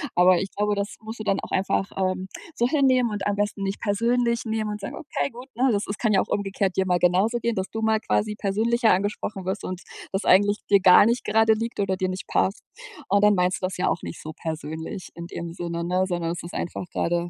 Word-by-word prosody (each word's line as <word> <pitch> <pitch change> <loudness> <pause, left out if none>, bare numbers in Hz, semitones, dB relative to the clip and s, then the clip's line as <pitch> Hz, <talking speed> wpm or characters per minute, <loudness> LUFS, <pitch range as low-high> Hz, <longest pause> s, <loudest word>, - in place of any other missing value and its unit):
Aber 180 +1 +6
ich 195 - -3
glaube, 210 0 +1
das 200 0 -3
musst 220 +1 -8
du - - -4
dann 200 -2 +1
auch - - -9
einfach, 195 +1 0
ähm, 185 0 -1 0.3
so 240 - +2
hinnehmen 255 -4 +3
und 205 -2 -2
am 205 - +1
besten 205 0 -2
nicht 195 +1 -2
persönlich 235 +3 +1
nehmen 220 -1 -2
und 210 0 -6
sagen: 200 - -6
„Okay, 305 -2 -3
gut.“ 250 +1 -11
Ne, 260 +3 +3
es 200 - -1
es 200 - -4
kann 220 - +1
ja 195 - +4
auch - - -4
umgekehrt 195 -1 -1
dir 190 - +1
mal 180 -1 +2
genauso 185 +7 +3
gehen, 235 0 -1
dass 190 0 -2
du 225 - -4
mal 220 0 +2
quasi 215 -1 0
persönlicher 220 +3 +2
angesprochen 195 0 -2
wirst 190 +2 -3
und 185 0 -5 0.3
das 195 +1 -2
eigentlich 205 +2 +5
dir 200 - +6
gar 185 +2 +8
nicht 235 +2 +1
gerade 220 +1 +4
liegt 230 +1 -4
oder 190 -2 0
dir 185 -1 -1
nicht 185 +1 -5
passt. 195 - 0 0.5
Und 200 0 +3
dann 210 0 +6
meinst 180 0 +1
du - - 0
das 185 - -4
ja 180 - 0
auch - - -1
nicht - - -7
so 155 - -7
persönlich 160 +2 -5
in 170 0 -7
dem 170 -1 -6
Sinne, 170 -1 -4
ne? 180 +2 +1
Sondern 175 -2 -2
es 175 - -5
ist 170 - -9
einfach 175 - -4
grade 170 0 -1
200 Hz, 245 wpm, -24 LUFS, 185-220 Hz, 0.5 s, gar